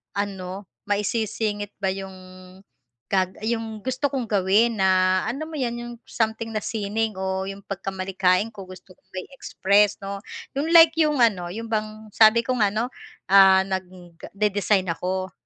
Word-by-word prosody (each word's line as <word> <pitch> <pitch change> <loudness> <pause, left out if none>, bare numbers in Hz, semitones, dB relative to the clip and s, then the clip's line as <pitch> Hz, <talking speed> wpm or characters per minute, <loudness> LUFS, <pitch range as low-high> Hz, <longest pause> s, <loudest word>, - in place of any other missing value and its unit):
ano, 195 -1 -4 0.2
mai-sisingit 205 0 -2
ba 190 -1 +1
'yong 190 0 -7 1.0
gag 185 -1 0
'yong 225 -1 -3
gusto 260 +2 -1
kong 255 -4 -3
gawin 210 +3 +2
na 185 0 +3
alam 285 +6 -4
mo 320 - -8
'yan 245 -4 -2
'yong 240 0 -7
something 225 0 -2
na 215 - -1
sining 220 0 -2
o 190 0 -3
'yong 195 0 -8
pagka-malikhain 190 +1 -1
ko 195 -3 -10
gusto 185 0 -13
kong 190 - -39
mai-express 205 -2 +1
'no, 200 0 -5 0.4
'yong 290 +3 -1
like 330 -1 +9
'yong 300 -4 +2
ano, 185 -6 +2
'yong 225 +3 -6
bang 215 0 -4
sabi 225 +2 +5
ko 255 +1 -1
nga 210 - +4
no, 235 +4 -2 0.4
ah, 190 -1 +7
nag-dedesign 190 +2 -2
ako 185 +2 -3
205 Hz, 150 wpm, -24 LUFS, 190-225 Hz, 1.0 s, like